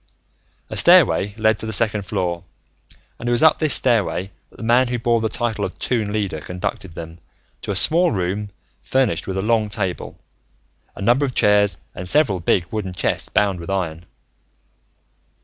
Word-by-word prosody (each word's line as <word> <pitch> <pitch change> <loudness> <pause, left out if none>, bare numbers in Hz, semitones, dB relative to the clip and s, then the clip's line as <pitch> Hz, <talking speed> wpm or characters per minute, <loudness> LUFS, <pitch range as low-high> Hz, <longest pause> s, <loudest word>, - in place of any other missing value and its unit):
A - - -4
stairway 100 +1 +4
led 110 -1 +1
to 110 - -4
the - - -3
second 105 -2 +2
floor, 90 -3 -3 0.8
and 120 - -3
it - - 0
was 120 +5 +2
up 160 - +5
this 155 -3 +2
stairway 105 -6 +1 0.2
that - - -21
the - - -9
man 120 +3 +3
who 120 0 -2
bore 115 0 +1
the 110 - -1
title 110 -2 -2
of 95 - -5
Toon 110 -5 -2
Leader 100 -7 -2
conducted 90 +1 -5
them, 80 0 -9 0.4
to - - -8
a 100 - -1
small 170 - +5
room 100 +2 -3 0.3
furnished 130 -10 0
with 95 0 -3
a 95 - -2
long 110 -1 +1
table, 95 -4 -4 0.8
a - - -7
number 120 +7 +3
of 130 -3 -2
chairs, 105 -1 +3 0.2
and 90 0 -5
several 140 -10 +2
big 85 +1 +1
wooden 105 -4 -4
chests - - -2
bound 100 -3 +1
with 85 - -9
iron. 85 -3 -3
105 Hz, 180 wpm, -20 LUFS, 95-115 Hz, 0.8 s, up